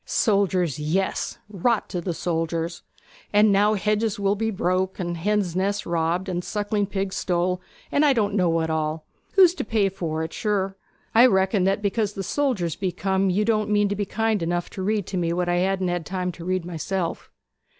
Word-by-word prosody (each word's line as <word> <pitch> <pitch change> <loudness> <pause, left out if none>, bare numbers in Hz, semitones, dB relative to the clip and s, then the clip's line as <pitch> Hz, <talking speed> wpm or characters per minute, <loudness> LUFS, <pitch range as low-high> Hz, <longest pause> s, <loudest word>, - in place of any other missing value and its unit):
'Soldiers, 185 - +1
yes 170 +6 -1
rot 210 +3 0
the 175 -1 -3
soldiers! 165 0 -2 0.5
And 210 0 +5
now 205 +2 +4
hedges 210 +1 0
will 200 0 +2
be 225 +2 -1
broke, 185 -1 0
and 175 -1 -2
hens' 190 0 0
nests 200 +2 0
robbed, 170 +3 0
and 180 -1 -2
sucking 205 0 -1
pigs 195 -1 -3
stole, 180 0 0 0.3
and 285 - +3
I 295 - +5
don't 215 -6 +1
know 185 -4 +2
what 165 -1 0
all. 155 0 -2 0.3
Who's 370 -4 +7
to - - -4
pay 210 -3 +1
for't, 160 -3 -3
sure? 195 -3 -1 0.4
I 235 +3 +8
reckon 190 -2 +2
that 195 +2 +1
because 205 0 0
the 195 - -4
soldiers 210 - 0
be 190 -2 -2
come 190 +1 0
you 200 +4 +1
don't 215 -2 +1
mean 205 -1 +3
to 205 - -1
be 205 0 -1
kind 225 -1 0
enough 175 +1 -2
to 190 - -6
read 205 0 0
to 190 - -4
me 170 -1 0
what 175 0 -1
I 175 0 +1
hadn't 180 -3 0
time 180 -1 -2
to 170 - -11
read 185 -1 -1
myself.' 175 +1 -3
190 Hz, 190 wpm, -24 LUFS, 175-210 Hz, 0.5 s, I